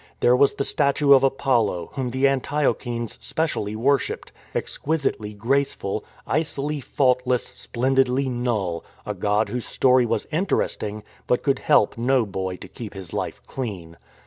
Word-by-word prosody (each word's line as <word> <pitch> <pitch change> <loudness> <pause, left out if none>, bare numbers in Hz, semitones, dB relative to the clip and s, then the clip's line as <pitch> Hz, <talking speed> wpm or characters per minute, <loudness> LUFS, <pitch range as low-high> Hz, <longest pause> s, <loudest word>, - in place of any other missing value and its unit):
There 125 - +5
was 140 +2 +4
the - - -1
statue 140 0 +3
of 135 - +6
Apollo, 120 -10 +1
whom 130 -3 -2
the 130 +3 +2
Antiochenes 130 -4 -1
specially 150 -10 -2
worshipped, 135 +4 0 0.2
exquisitely 135 -9 -2
graceful, 115 -3 0
" - - -27
icily 150 -1 -1
fault 125 -1 +2
less, 125 -1 +1
splendidly 130 +1 0
null 115 -9 -1
"; - - -29
a - - -2
god 105 +1 +1
whose 125 -1 -3
story 125 -2 +4
was 115 - -1
interest 180 +5 0
ing, 105 0 -4 0.2
but 125 - +1
could 140 -2 +2
help 105 - +3
no 125 0 +3
boy 95 -2 -3
to - - -10
keep 110 -4 -9
his 95 -3 -9
life - - -4
clean. 95 -10 -6
125 Hz, 155 wpm, -24 LUFS, 110-135 Hz, 0.2 s, of